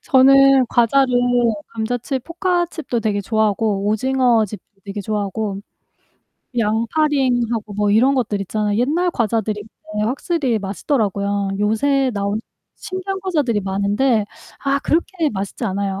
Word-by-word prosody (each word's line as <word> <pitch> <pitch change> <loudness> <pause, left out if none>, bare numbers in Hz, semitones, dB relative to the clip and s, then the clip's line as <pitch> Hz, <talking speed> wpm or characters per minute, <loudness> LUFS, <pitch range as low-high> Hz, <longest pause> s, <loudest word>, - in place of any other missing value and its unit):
저는 275 -2 +6
과자를 250 +2 +3 0.5
감자칩 245 +3 -3
포카칩도 345 -7 -1
되게 210 -2 0
좋아하고 210 -1 0
오징어칩 225 -2 +1 0.2
되게 200 +1 -5
좋아하고 205 0 -3 1.0
양파링하고 235 -1 0
뭐 205 0 +1
이런 250 +6 +4
것들 215 -6 -1
있잖아요. 210 +2 -1
옛날 330 +8 +1
과자들이 215 -4 -1 0.3
근데 210 0 -1
확실히 265 -2 -1
맛있더라고요. 200 -1 -1
요새 260 +6 +2
나온 200 +2 -1 0.4
신기한 375 +1 -5
과자들이 295 - 0
많은데 205 +4 +1 0.4
아 275 0 +2
그렇게 330 +2 0
맛있지 200 +4 -4
않아요. 195 -1 -2
225 Hz, 310 characters per minute, -20 LUFS, 205-275 Hz, 1.0 s, 저는